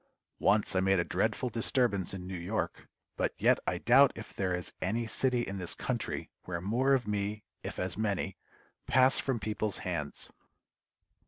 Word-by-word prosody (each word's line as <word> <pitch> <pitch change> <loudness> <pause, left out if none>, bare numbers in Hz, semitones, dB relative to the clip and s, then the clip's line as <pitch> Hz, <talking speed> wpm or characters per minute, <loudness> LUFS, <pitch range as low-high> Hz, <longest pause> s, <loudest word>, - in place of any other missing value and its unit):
Once 100 -1 +3
I - - +4
made 95 +1 +3
a 85 - +2
dreadful 110 +8 0
disturbance 115 -4 +1
in 95 -2 -6
New 95 - -6
York, 90 +6 -3 0.3
but - - 0
yet - - +4
I - - +1
doubt 135 +3 +6
if - - -9
there 95 -2 -1
is 90 0 -2
any 115 +5 0
city 125 +2 +1
in 95 -3 -5
this 90 - -2
country - - -3
where 85 -1 -3
more 125 +9 +2
of 125 -4 -2
me, 105 0 -2 0.2
if - - -6
as 90 +2 -2
many, 100 -3 -1 0.5
pass 130 +2 +5
from 130 -4 -1
people's 105 0 -1
hands. 80 -6 -4
105 Hz, 170 wpm, -31 LUFS, 95-120 Hz, 0.5 s, doubt